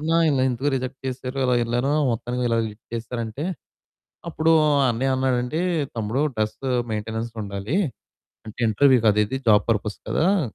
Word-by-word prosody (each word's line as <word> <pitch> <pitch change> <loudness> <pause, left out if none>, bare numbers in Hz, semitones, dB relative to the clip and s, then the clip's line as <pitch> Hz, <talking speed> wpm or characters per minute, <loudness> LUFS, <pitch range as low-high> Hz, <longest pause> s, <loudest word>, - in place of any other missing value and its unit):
అన్న 160 +2 -1 0.2
ఇలా 135 -3 +1
ఎందుకు 130 +4 -1
రిజెక్ట్ 130 +1 -5
చేసారు. 130 +1 -5
ఇలా 125 -1 +3
యెళ్ళాను, 120 +4 0 0.2
మొత్తానికి 120 +2 -3
ఇలా 115 -1 +1
ఇది 105 - -11 0.2
చేసేసారు 115 +1 -4
అంటే, 110 +7 -5 0.9
అప్పుడు 160 0 +1 0.4
అన్నయ్య 130 +3 0
అన్నాడండి. 130 +2 0 0.4
"తమ్ముడు 110 +5 -1
డ్రెస్ 110 0 -1 0.3
మెయిన్‌టెనెన్స్ 110 +2 -3
ఉండాలి. 100 - -4 0.7
అంటే 110 +2 -9
ఇంటర్వ్యూ 130 +4 +5
కదా! 105 0 +3
ఇది 130 +5 -3
జాబ్ 105 -1 +5
పర్పస్ 105 -1 -1
కదా!" 190 +4 +2
125 Hz, 150 wpm, -23 LUFS, 110-135 Hz, 0.9 s, ఇంటర్వ్యూ